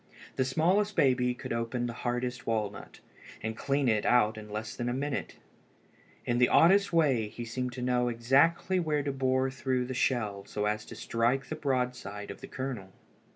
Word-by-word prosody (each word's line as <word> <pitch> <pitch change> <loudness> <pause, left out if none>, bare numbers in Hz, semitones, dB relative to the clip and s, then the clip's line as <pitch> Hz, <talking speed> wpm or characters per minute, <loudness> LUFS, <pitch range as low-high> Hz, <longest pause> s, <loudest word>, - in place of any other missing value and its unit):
The 130 - +1
smallest 185 +10 +2
baby 125 -2 +3
could - - -5
open 115 +1 -2
the 120 - -3
hardest 125 +1 -3
walnut, 110 -3 -3 0.4
and 110 0 -3
clean 140 +3 0
it 110 -3 +2
out 115 -3 +3
in 105 -1 -9
less 110 +1 -5
than 120 0 -2
a 120 - -1
minute. 140 +1 -3 0.9
In 120 0 +1
the 125 - +5
oddest 200 +4 +5
way 140 -10 +3
he 120 +3 -7
seemed 125 +2 -3
to 125 - -5
know 125 -1 +2
exactly 140 +10 +3
where 150 -4 0
to 140 - -1
bore 130 0 +1
through 130 -1 -1
the 130 - -4
shell 110 -6 0
so 105 - -2
as 105 0 -1
to - - -10
strike 120 +4 0
the 155 - -3
broad 130 -5 0
side 105 -2 -7
of - - -11
the - - -8
kernel. 130 -8 -5
125 Hz, 190 wpm, -30 LUFS, 115-135 Hz, 0.9 s, the